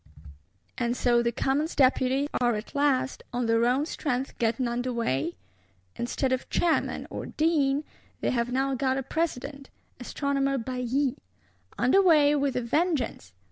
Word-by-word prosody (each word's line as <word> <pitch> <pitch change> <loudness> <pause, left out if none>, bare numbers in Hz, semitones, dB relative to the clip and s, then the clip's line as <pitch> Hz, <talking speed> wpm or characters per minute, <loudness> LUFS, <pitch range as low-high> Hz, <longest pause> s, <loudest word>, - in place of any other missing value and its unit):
And 240 0 0
so 240 -1 +3
the 235 0 0
Commons 280 +6 -1
Deputies 265 0 +3
are 240 -2 +3
at 210 +1 -7
last 270 -2 +1
on 245 0 -1
their 230 +1 +3
own 260 +4 +2
strength 270 -5 -3
getting 235 +1 +1
under 245 +2 -2
way? 170 - -1 0.6
Instead 255 +2 -1
of 260 0 -2
Chairman, 340 -2 0
or - - -5
Dean, 300 -3 +1 0.4
they - - 0
have 240 0 -1
now 270 +2 0
got 260 0 0
a 270 - -2
President: 280 -2 -3 0.3
Astronomer 275 +2 -1
Bailly. 255 +2 -1 0.6
Under 385 +11 +4
way, 305 -6 +5
with 280 -3 0
a 250 - 0
vengeance! 290 - -1
260 Hz, 145 wpm, -27 LUFS, 240-280 Hz, 0.6 s, way